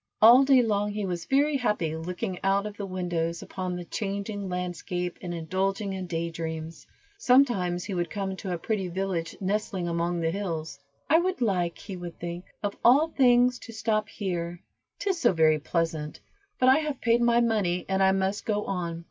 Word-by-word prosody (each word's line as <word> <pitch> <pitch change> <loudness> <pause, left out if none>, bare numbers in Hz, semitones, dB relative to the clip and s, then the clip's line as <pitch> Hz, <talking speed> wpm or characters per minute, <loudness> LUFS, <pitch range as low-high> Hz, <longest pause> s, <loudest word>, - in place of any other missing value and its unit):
All 240 +5 +8
day 265 -2 +5
long 210 -2 0
he 210 -1 -2
was 175 -2 -3
very 285 +2 +2
happy 210 - 0
looking 180 +2 -4
out 195 +1 +2
of 210 -1 -6
the 200 -1 -5
windows 175 -3 -2
upon 185 -1 -4
the 175 -1 -6
changing 200 +1 -4
landscape, 180 0 -3
and 175 - -5
indulging 190 +4 -2
in 190 -1 -5
day 170 0 -2
dreams. 160 0 -6 0.3
Sometimes 235 - +3
he 200 - -5
would 175 -1 -1
come 195 -2 -3
to 190 - -5
a 175 - -1
pretty 195 +1 -2
village 180 -2 -3
nestling 195 -2 -1
among 170 +1 -1
the 165 -1 0
hills. 165 -6 -4 0.3
"I 320 +3 +5
would 370 +2 -1
like," 180 -7 0
he 195 -3 -8
would 175 -1 -8
think, 175 +1 -6 0.2
"of 205 -1 -2
all 285 +7 +6
things 250 -3 +4
to 230 - -10
stop 215 -1 0
here, 175 -4 -4 0.4
'tis 385 -4 -1
so 240 - +4
very 155 -2 +4
pleasant, 160 -1 -2 0.4
but 255 - +3
I 260 +2 +7
have 300 -4 -3
paid 235 0 +2
my 235 0 +4
money, 210 -7 +1
and 190 0 0
I 190 0 +5
must 195 +1 0
go 210 -1 -1
on." 170 -3 -3
190 Hz, 190 wpm, -27 LUFS, 175-215 Hz, 0.4 s, All